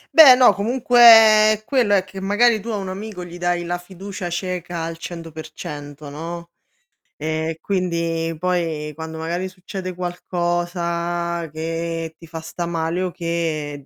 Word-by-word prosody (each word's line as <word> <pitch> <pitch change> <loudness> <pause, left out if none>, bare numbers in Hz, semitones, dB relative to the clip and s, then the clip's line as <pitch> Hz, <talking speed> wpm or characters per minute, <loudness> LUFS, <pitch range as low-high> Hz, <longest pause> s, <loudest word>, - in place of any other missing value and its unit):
Beh, 285 -6 +10
no, 250 -1 +6
comunque 245 +3 +1
è 215 -2 +8
quello 240 -7 +2
è 185 - +2
che 190 0 -9
magari, 215 +3 +3
tu 230 - -11
a 215 - -1
un 195 -2 -4
amico 195 -1 -6
gli 175 0 -10
dai 175 0 0
la 175 +1 -2
fiducia 185 0 -7
cieca 175 -1 -4
al 165 0 -5
100% 155 -3 -8
no, 170 +3 -7 0.7
e 160 +1 -2
quindi 170 -3 -1
poi, 165 -4 -1
quando 160 0 -7
magari 175 +3 -3
succede 185 0 -7
qualcosa 175 -1 -2
che 165 0 -4
ti 165 - -14
fa 160 0 -7
sta 170 +2 -5
male 170 +1 -2
o 185 - -1
che, 160 -5 -3
175 Hz, 145 wpm, -21 LUFS, 165-190 Hz, 0.7 s, Beh